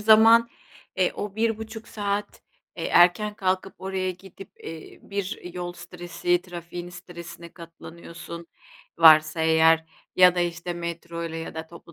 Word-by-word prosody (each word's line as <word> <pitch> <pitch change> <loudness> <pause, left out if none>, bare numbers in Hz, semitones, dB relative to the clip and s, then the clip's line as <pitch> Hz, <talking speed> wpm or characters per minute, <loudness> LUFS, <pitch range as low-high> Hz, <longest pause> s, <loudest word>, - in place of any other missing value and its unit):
zaman, 225 +2 +6 0.5
eee, 185 -1 +2
o 205 -1 -6
1.30 220 0 -2
saat, 205 -1 -3 0.3
eee, 165 - -4
erken 180 +5 +4
kalkıp 190 -1 -1
oraya 190 -1 -2
gidip, 190 +1 -12
eee, 160 -1 -9
bir 195 -3 -5
yol 175 -1 -4
stresi 175 0 -2
trafiğin 175 -1 -8
stresine 170 -1 -10
katlanıyorsun 170 0 -10 0.5
-varsa 155 0 +7
eğer 160 0 +4 0.3
ya 180 -1 +7
da 180 - 0
işte 175 0 -2
metroyla 170 -1 -5
ya 165 - -7
da 160 0 -6
toplu 170 0 -15
175 Hz, 130 wpm, -25 LUFS, 170-195 Hz, 0.5 s, varsa